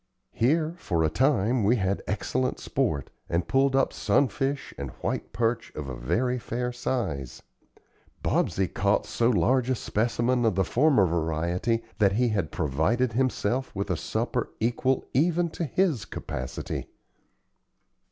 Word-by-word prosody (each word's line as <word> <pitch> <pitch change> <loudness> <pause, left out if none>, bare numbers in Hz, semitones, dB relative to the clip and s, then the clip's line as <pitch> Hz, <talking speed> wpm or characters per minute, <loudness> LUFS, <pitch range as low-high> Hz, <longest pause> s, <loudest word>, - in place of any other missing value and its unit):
Here, 155 +7 +1
for 85 - 0
a 80 - +2
time, 125 - +2
we 110 +5 +4
had 95 -3 0
excellent 125 +5 -1
sport, 105 - -1 0.2
and 85 0 0
pulled 135 +5 +3
up 135 - +2
sunfish 140 0 0
and 70 -1 -5
white - - -2
perch 115 0 -1
of 75 -2 -5
a 65 - -4
very 125 - 0
fair 125 +1 -3
size. 80 - -3 0.8
Bobsey 95 -1 +1
caught 100 +4 +1
so 115 0 +1
large 125 +5 +2
a 130 - +2
specimen 120 +3 0
of 110 -5 +2
the 95 -1 +2
former 130 -6 +4
variety 85 +7 0 0.2
that 100 -2 +4
he 120 +3 +2
had 100 -8 -1
provided 85 - +1
himself 130 0 0
with 100 0 -2
a - - +2
supper - - -2
equal 120 +3 +1
even 170 +4 +2
to 170 - -3
his 160 - +1
capacity. 60 0 -5
115 Hz, 140 wpm, -27 LUFS, 95-130 Hz, 0.8 s, we